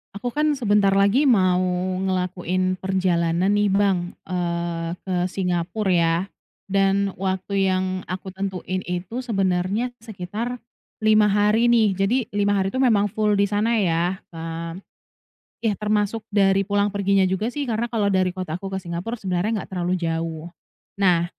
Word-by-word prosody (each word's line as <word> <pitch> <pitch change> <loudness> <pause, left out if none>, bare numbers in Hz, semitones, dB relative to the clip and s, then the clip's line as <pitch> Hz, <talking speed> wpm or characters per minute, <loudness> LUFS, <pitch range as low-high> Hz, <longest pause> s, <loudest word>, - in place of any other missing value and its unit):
Aku 240 +4 -3
kan 300 +1 +1
sebentar 205 -6 +3
lagi 200 +9 +4
mau 185 -7 +4 0.5
ngelakuin 185 0 -1
perjalanan 185 -1 +1
nih 205 0 +3
Bang, 190 -3 +1
eee, 170 -2 -2
ke 185 -1 -2
Singapura 185 +2 -1
ya, 170 +2 +1 0.4
dan 195 0 +2
waktu 190 +1 0
yang 185 0 +1 0.2
aku 185 +1 -5
tentuin 185 -1 -3
itu 180 +6 -4
sebenarnya 195 0 0
sekitar 220 +2 -5 0.5
5 215 -1 +5
hari 210 +3 +3
nih. 230 -3 +4
Jadi 195 +6 +2
5 205 0 +1
hari 195 0 0
itu 260 - -2
memang 210 -6 +3
full 210 0 +1
di 200 - +3
sana 210 +3 +1
ya, 175 -3 +1 0.2
eee 165 +1 -6 0.9
ya 220 - +3
termasuk 210 +1 -1
dari 195 -1 +4
pulang 205 +1 +1
perginya 200 -1 +2
juga 190 +4 -1
sih 285 -1 -3
karena 225 0 0
kalau 225 -4 0
dari 185 -2 +2
kota 185 -3 -4
aku 195 +1 -7
ke 190 - -2
Singapura 180 +6 -4
sebenarnya 195 +3 -1
nggak - - -18
terlalu 175 0 -1
jauh. 165 -1 -3 0.5
Nah, 175 -3 +4
195 Hz, 150 wpm, -23 LUFS, 180-210 Hz, 0.9 s, 5